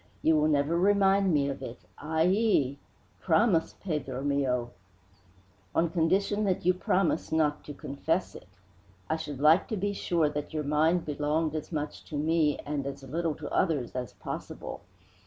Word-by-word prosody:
"You 160 - +4
will 155 0 +3
never 150 +2 +2
remind 195 0 +4
me 145 -3 +2
of 140 - -4
it. 115 - -8
Ay 160 +1 0
yi! 180 - +2 0.4
promise 165 0 +2
Pedro 135 -7 -3
mio!" 130 -4 0 1.0
"On 165 0 +2
condition 195 +5 +1
that 185 -3 0
you 180 - +5
promise 180 -1 0
not 155 -2 +1
to 145 - -7
confess 160 +7 -2
it. - - -12 0.6
I - - +3
should 145 -4 -6
like 155 +5 +5
to 220 - -3
be 200 +2 -1
sure 170 -5 +1
that 150 +1 -4
your 155 - -1
mind 160 +4 +2
belonged 150 +1 0
as 155 +1 -5
much 150 -2 -4
to 155 - -7
me 155 0 +2
and 145 -2 -2
as 140 0 -6
little 160 +3 -2
to 150 -2 -7
others 155 -10 +1
as 125 -1 -4
possible. - - -7
155 Hz, 165 wpm, -29 LUFS, 145-175 Hz, 1.0 s, you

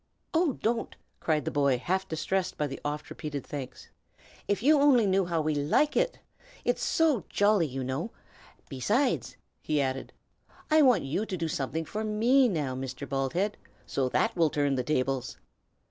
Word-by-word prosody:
"Oh, 325 -3 +3
don't!" 230 +1 -2 0.2
cried 155 -2 0
the - - -1
boy, 140 -3 +2
half 190 +9 -1
distressed 175 +4 -2
by 150 - 0
the 135 - -6
oft 150 +1 -4
repeated 145 -4 -5
thanks. 140 -4 -7 0.6
"If 205 +2 0
you 300 +2 +5
only 260 -6 +5
knew 195 -1 +2
how 170 -2 0
we 155 0 +1
like 150 - +2
it! - - +1 0.5
It's - - 0
so 305 - +2
jolly, 205 -5 +3
you 135 -1 -4
know. 130 - -3 0.6
Besides," 215 - 0 0.2
he 150 -1 0
added, 135 -1 -2 0.6
"I 310 0 +6
want 255 -5 +5
you 175 +11 -2
to 185 - -3
do 165 - -2
something 160 +2 -2
for 215 +7 -4
me 235 +5 +3
now, 150 -9 -1
Mr. 130 +1 -5
Baldhead, 140 - -1 0.3
so 130 -2 -1
that 225 - +1
will 165 -3 +3
turn 145 -1 +1
the 130 - 0
tables. 130 -1 -1
160 Hz, 170 wpm, -28 LUFS, 140-220 Hz, 0.6 s, I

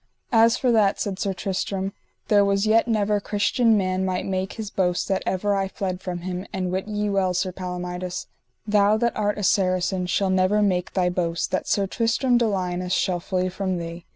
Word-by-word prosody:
As 230 0 +5
for 250 - +1
that, 210 -3 +3
said 195 -2 -3
Sir 200 - 0
Tristram, 195 0 -3 0.3
there 205 -1 +5
was 200 +1 +1
yet 225 +2 +3
never 210 -2 +1
Christian 215 +3 +2
man 185 -1 0
might 185 -1 -1
make 190 0 -2
his 215 -3 -6
boast 180 -2 0
that 190 - +1
ever 200 +2 0
I 195 -1 0
fled 185 -1 -4
from 175 -2 -5
him; 180 +1 -5
and 185 -1 -2
wit 190 +2 -2
ye 210 -1 -2
well, 195 -2 +1
Sir 185 +1 0
Palomides, 180 0 -5 0.4
thou 210 0 +3
that 235 +1 0
art 210 -1 0
a 205 - -4
Saracen 185 -1 +1
shall 190 +2 +1
never 190 +3 +3
make 180 -3 0
thy 180 -2 +2
boast 170 -2 -1
that 185 - -1
Sir 200 - +1
Tristram 240 +4 +1
de 235 - +2
Liones 180 -3 -2
shall 185 -2 +1
flee 185 +1 -1
from 185 0 -2
thee. 170 0 -7
190 Hz, 200 wpm, -24 LUFS, 185-210 Hz, 0.4 s, As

